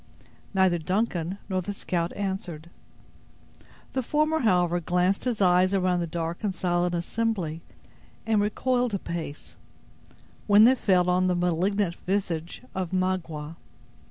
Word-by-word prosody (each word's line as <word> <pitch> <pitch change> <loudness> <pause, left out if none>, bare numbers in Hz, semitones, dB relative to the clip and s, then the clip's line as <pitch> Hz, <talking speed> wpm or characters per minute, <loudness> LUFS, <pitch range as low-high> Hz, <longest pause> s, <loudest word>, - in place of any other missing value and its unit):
Neither 190 -2 +3
Duncan 185 0 -1
nor 185 -2 -1
the 205 +3 -4
scout 175 -3 -2
answered. 180 -5 -4 1.2
The 265 - 0
former, 305 +5 +1
however, 180 - +2
glanced 180 +5 0
his 240 -4 -1
eyes 185 +1 +4
around 180 -2 +2
the 170 - -2
dark 165 +3 -4
and 200 -3 -1
silent 175 0 0
assembly, 175 -3 -2 0.6
and 220 -2 +2
recoiled 245 +2 0
a - - +1
pace, 165 -5 -6 0.9
when 205 +1 +7
they 245 +3 +7
fell 185 -8 +2
on 180 +1 +2
the 180 - +2
malignant 180 +2 +1
visage 180 -2 -2
of 185 -2 -3
Magua. 170 -4 -2
185 Hz, 130 wpm, -26 LUFS, 175-205 Hz, 1.2 s, when